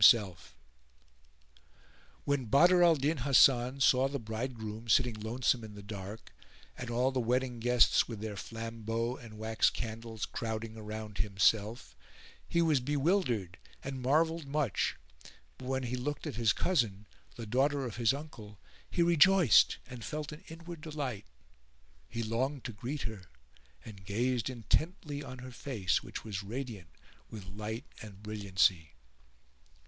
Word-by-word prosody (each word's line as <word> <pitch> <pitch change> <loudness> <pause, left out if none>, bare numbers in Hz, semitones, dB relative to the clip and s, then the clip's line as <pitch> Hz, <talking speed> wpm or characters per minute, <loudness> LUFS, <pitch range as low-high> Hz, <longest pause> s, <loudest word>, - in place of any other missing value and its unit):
[FN#412] 105 -3 +7 1.9
When 140 -3 0
Badr 175 +10 +5
al 170 -2 +7
Din 150 +3 0
Hasan 130 0 +4
saw 130 0 +5
the 140 +1 -3
bridegroom 110 -1 -5
sitting 125 +1 +4
lonesome 115 +3 0
in 105 -1 -9
the 100 - -10
dark, 100 +1 -8 0.4
and 125 - -6
all 125 +3 +1
the 130 - -1
wedding 125 +1 0
guests 125 +1 +4
with 115 -3 -6
their 110 0 -4
flambeaux 115 +2 -4
and 115 -5 -12
wax 110 +1 +2
candles 115 -1 -5
crowding 110 0 -4
around 110 -1 -7
himself, 105 - +1 0.5
he 170 - +3
was 155 -4 +3
bewildered 135 - 0 0.2
and 135 -1 -5
marvelled 160 +4 +2
much; 140 -8 0 0.6
but 130 - -8
when 130 0 -1
he 125 +1 -2
looked 145 +5 -3
at 150 - -3
his 115 -2 +3
cousin, 110 - 0 0.3
the 115 - -6
daughter 135 +5 +1
of 115 -3 -6
his 115 -1 +4
uncle, 115 -8 -8 0.3
he 175 - +2
rejoiced 170 - +6
and 125 -2 -9
felt 150 +3 -4
an 150 +5 -10
inward 165 0 -9
delight: 145 -9 -4 0.8
he 115 - -3
longed 130 +5 -1
to 120 - -5
greet 125 +8 -4
her 110 -5 -6 0.6
and 100 -4 -11
gazed 120 +5 0
intently 145 - -1
on 130 -3 -8
her 130 +1 -9
face 115 -7 -1
which - - -7
was 105 -3 -4
radiant 110 -4 -6 0.4
with 105 -4 -8
light 105 +6 -6 0.2
and 105 -2 -11
brilliancy. 95 -6 +1
120 Hz, 145 wpm, -32 LUFS, 110-140 Hz, 1.9 s, FN#412